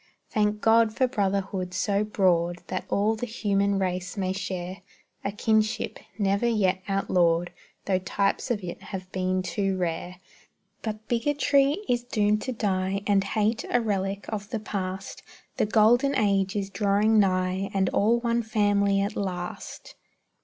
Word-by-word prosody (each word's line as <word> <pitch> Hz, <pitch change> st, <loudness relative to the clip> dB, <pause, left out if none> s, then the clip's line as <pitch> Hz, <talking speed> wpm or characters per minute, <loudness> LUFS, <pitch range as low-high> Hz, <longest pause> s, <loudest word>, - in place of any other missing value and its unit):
Thank 210 Hz, 0 st, +1 dB
God 225 Hz, 0 st, +4 dB
for 260 Hz, -, +4 dB
brotherhood 195 Hz, -5 st, -1 dB
so 200 Hz, +2 st, +1 dB
broad 175 Hz, -4 st, +1 dB
That 185 Hz, -, -3 dB
all 210 Hz, +2 st, +2 dB
the 245 Hz, +3 st, -4 dB
human 200 Hz, -3 st, 0 dB
race 185 Hz, 0 st, -2 dB
may 185 Hz, -1 st, 0 dB
share 185 Hz, -1 st, -5 dB, 0.4 s
A 200 Hz, -, -1 dB
kinship, 215 Hz, +1 st, 0 dB, 0.2 s
never 200 Hz, +2 st, +1 dB
yet 190 Hz, -5 st, +1 dB
outlawed, 175 Hz, -3 st, +1 dB, 0.3 s
Tho' 190 Hz, -2 st, +1 dB
types 195 Hz, +5 st, -1 dB
of 215 Hz, -5 st, -1 dB
it 175 Hz, -1 st, -6 dB
have 185 Hz, -1 st, -7 dB
been 185 Hz, 0 st, 0 dB
too 190 Hz, +2 st, -1 dB
rare. 175 Hz, 0 st, -3 dB, 0.7 s
But 215 Hz, -1 st, -5 dB
bigotry 280 Hz, +3 st, +2 dB
is 240 Hz, -1 st, +1 dB
doomed 210 Hz, -3 st, +1 dB
to 260 Hz, -, -3 dB
die, 195 Hz, -3 st, -1 dB
And 200 Hz, -1 st, +3 dB
hate, 215 Hz, +2 st, 0 dB
a 245 Hz, -, +3 dB
relic 200 Hz, -3 st, -2 dB
of 205 Hz, -2 st, -5 dB
the 225 Hz, -, -2 dB
past; 195 Hz, -2 st, -5 dB, 0.4 s
The -, -, +2 dB
golden 240 Hz, +6 st, +4 dB
age 195 Hz, -3 st, +1 dB
is 200 Hz, -1 st, -2 dB
drawing 210 Hz, +2 st, +3 dB
nigh, 185 Hz, 0 st, +1 dB
And 190 Hz, -1 st, +1 dB
all 230 Hz, +4 st, +2 dB
one 235 Hz, 0 st, +1 dB
family 205 Hz, -2 st, +2 dB
at 200 Hz, -, -2 dB
last! 180 Hz, -3 st, -5 dB
200 Hz, 150 wpm, -26 LUFS, 185-215 Hz, 0.7 s, God